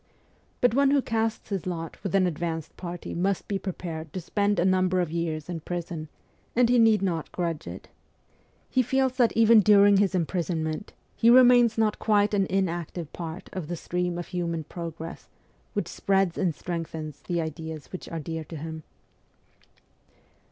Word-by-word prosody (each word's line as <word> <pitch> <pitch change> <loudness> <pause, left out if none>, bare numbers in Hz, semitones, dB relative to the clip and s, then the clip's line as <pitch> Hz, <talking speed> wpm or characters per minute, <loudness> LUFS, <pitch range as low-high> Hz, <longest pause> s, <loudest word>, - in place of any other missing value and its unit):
But 245 -2 +4
one 275 +2 +4
who 280 0 +4
casts 225 -3 -1
his 195 -3 -3
lot 165 -2 -4
with 195 -1 -2
an 190 -1 +4
advanced 165 -2 -3
party 175 -1 -6
must 190 +2 -1
be 200 -1 -1
prepared 165 -4 -5
to - - -3
spend 205 +3 0
a 175 - +2
number 185 -1 +2
of 175 -3 -1
years 165 -2 -2
in 175 -2 -4
prison, 165 -2 -5 0.5
and 240 0 +4
he 245 0 +4
need 220 -3 +5
not 170 -5 -2
grudge 170 -3 -3
it. - - -8 0.8
He 255 - +2
feels 265 +1 +1
that 240 -3 +4
even 225 0 +7
during 205 -1 +6
his 195 -1 +2
imprisonment 165 -1 -2 0.2
he 230 - +4
remains 245 -2 +7
not 220 -1 +1
quite 210 -1 +2
an 195 -2 +2
inactive 175 -4 -2
part 170 +2 -6
of 185 -5 -4
the 175 - -3
stream 180 +1 -2
of 175 - -6
human 170 -3 -2
progress 165 0 -7 0.5
which - - -1
spreads 195 -3 +1
and 175 -6 0
strengthens 160 -3 -5
the 175 -1 -2
ideas 160 -1 -5
which 185 - -7
are 165 - -4
dear 160 +1 -4
to 165 - -9
him. 160 +1 -6
180 Hz, 170 wpm, -26 LUFS, 165-205 Hz, 0.8 s, even